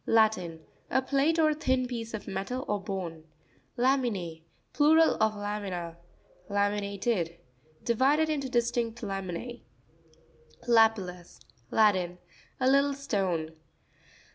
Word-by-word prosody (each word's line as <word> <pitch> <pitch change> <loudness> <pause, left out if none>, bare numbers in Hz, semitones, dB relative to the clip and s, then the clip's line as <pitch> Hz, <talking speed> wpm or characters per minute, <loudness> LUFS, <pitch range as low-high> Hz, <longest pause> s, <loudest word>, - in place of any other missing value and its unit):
—Latin. 200 -8 +2 0.3
A - - +3
plate, 280 +4 +1
or 310 -1 +4
thin 260 -4 0
piece 230 -2 -5
of 210 - -8
metal 200 +7 -3
or 205 -1 -1
bone. 180 -5 -5 0.5
La'min&%.—Plural 250 - +2
of 220 -1 +3
lamina. 200 -5 -4 0.5
La'miInATED.—Divided 200 - 0
into 285 -4 -2
distinct 235 -1 -1
lamine. 195 +4 -5 1.1
Lapi'LtLus.—Latin. 185 - +1 0.4
A 255 - +2
little 275 +1 +4
stone. 190 - -1
215 Hz, 90 wpm, -29 LUFS, 180-255 Hz, 1.1 s, or